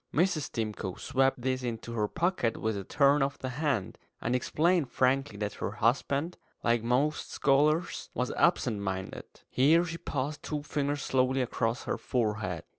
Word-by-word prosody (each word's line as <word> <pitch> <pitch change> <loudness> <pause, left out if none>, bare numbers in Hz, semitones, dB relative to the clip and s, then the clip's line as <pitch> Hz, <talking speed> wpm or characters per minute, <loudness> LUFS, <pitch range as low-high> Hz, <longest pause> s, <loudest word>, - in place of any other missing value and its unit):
Mrs. 160 -2 +1
Stimcoe 105 -5 -3
swept 135 -2 +1
this 130 0 0
into 115 -1 -4
her 105 -2 0
pocket 165 - 0
with 110 -1 -1
a 100 - -4
turn 140 +6 +3
of 140 +1 0
the 130 - -4
hand, 130 - -2 0.2
and 120 +2 0
explained 160 +3 +1
frankly 130 -3 +1
that 105 0 -3
her 100 - -2
husband, 140 +8 0 0.2
like 115 -1 +2
most 130 +6 0
scholars, 150 +5 +2
was 125 0 -1
absent 125 - +2
minded. 95 -1 -4 0.2
Here 160 +7 +4
she 165 0 -5
passed 145 +2 -3
two 150 -2 -4
fingers 145 -1 -2
slowly 130 0 +2
across 115 -1 -1
her - - -2
forehead. 105 -8 -1
130 Hz, 160 wpm, -29 LUFS, 115-145 Hz, 0.2 s, Here